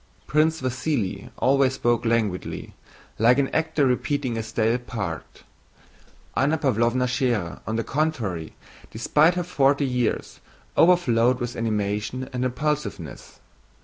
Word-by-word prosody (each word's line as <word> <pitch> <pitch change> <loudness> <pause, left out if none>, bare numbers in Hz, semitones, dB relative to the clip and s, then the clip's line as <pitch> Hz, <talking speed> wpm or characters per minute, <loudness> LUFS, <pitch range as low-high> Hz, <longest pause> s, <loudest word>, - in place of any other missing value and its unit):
Prince 155 +2 +2
Vasíli 125 -6 -2
always 135 0 +3
spoke 120 -2 +1
languidly, 110 -5 -1 0.5
like 120 +3 +5
an 140 -1 +2
actor 160 -2 +1
repeating 130 0 0
a 115 - -1
stale 115 +2 0
part. 100 -10 -6 0.9
Anna 145 +4 +2
Pávlovna 125 -2 +1
Schérer 120 -8 -1
on 110 - -1
the 115 - 0
contrary, 115 - -2 0.3
despite 150 +9 +3
her 180 - -1
forty 140 -4 +2
years, 125 -3 -1 0.4
overflowed 130 -9 +4
with 120 -1 -4
animation 105 +3 -2
and 125 0 -1
impulsiveness. 150 +4 -3
125 Hz, 115 wpm, -24 LUFS, 115-140 Hz, 0.9 s, like